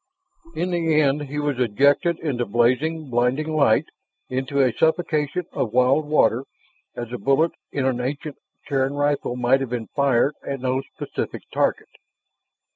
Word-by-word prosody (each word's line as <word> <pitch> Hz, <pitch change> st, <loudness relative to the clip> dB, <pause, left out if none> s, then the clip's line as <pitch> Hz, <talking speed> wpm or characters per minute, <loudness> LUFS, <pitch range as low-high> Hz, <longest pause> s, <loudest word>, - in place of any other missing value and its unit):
In 180 Hz, +1 st, -1 dB
the 165 Hz, -3 st, +2 dB
end 145 Hz, 0 st, +2 dB
he 145 Hz, +2 st, -6 dB
was 145 Hz, -3 st, -1 dB
ejected 140 Hz, -, +3 dB
into 135 Hz, -7 st, -1 dB
blazing, 130 Hz, +7 st, 0 dB
blinding 130 Hz, +6 st, 0 dB
light, 140 Hz, -8 st, +4 dB, 0.4 s
into 130 Hz, +2 st, -2 dB
a 130 Hz, -4 st, +3 dB
suffocation 160 Hz, +2 st, 0 dB
of 110 Hz, -, -2 dB
wild 130 Hz, +4 st, +3 dB
water 135 Hz, -4 st, +2 dB, 0.5 s
as 120 Hz, -1 st, -5 dB
the 125 Hz, 0 st, -5 dB
bullet 145 Hz, +5 st, +2 dB, 0.2 s
in 140 Hz, -2 st, -1 dB
an 125 Hz, -2 st, 0 dB
ancient 140 Hz, +3 st, -4 dB, 0.3 s
Terran 135 Hz, -1 st, 0 dB
rifle 145 Hz, -3 st, 0 dB
might 125 Hz, +2 st, +3 dB
have 135 Hz, -, -3 dB
been 120 Hz, -2 st, -4 dB
fired 140 Hz, 0 st, +3 dB
at 140 Hz, -1 st, -4 dB
no 130 Hz, +1 st, 0 dB
specific -, -, -5 dB
target. -, -, 0 dB
140 Hz, 150 wpm, -23 LUFS, 125-150 Hz, 0.5 s, light